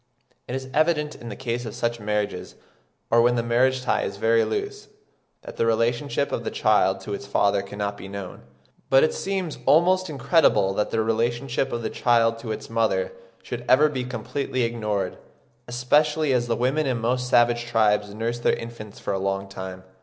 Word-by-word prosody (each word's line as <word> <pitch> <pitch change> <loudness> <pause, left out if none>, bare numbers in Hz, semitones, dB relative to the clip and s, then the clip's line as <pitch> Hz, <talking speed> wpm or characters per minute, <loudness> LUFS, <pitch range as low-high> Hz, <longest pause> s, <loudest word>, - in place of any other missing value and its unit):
It 125 - -4
is 130 0 -5
evident 150 -1 +2
in 120 - -9
the - - -6
case 120 -2 -3
of 110 -3 -7
such 120 0 -1
marriages, 105 -3 -3 0.6
or 115 0 +6
where 120 +1 +4
the 120 -1 0
marriage 130 +2 +2
tie 125 - +1
is 100 - -4
very 115 +2 +3
loose, 415 0 -4 0.6
that - - -10
the - - +2
relationship 120 +5 0
of - - -2
the - - -2
child - - +2
to 105 - -6
its 100 0 -6
father 100 0 +2
cannot 100 +1 -4
be 100 - -9
known. 100 -2 -7 0.5
But 135 0 +6
it 155 - +2
seems 190 -5 -3
almost 185 +3 +4
incredible 135 - +3
that 105 +1 -1
the 110 -1 0
relationship 120 +4 -1
of 120 -1 -3
the 110 - -2
child 115 -2 +2
to 115 -1 -5
its 110 - -5
mother 110 -5 0 0.3
should 120 0 -6
ever 150 +4 +6
be 130 -4 -3
completely 125 +2 -3
ignored, 105 -5 -2 0.5
especially 150 +4 +2
as 120 -1 +1
the 115 - +1
women 135 +6 0
in 130 -2 0
most 125 +2 -1
savage 120 -1 +3
tribes 105 -3 +2
nurse 115 +3 -3
their - - +2
infants 115 -3 -9
for - - -3
a 95 - -1
long 95 0 -2
time. 95 -1 -8
120 Hz, 190 wpm, -24 LUFS, 105-130 Hz, 0.6 s, or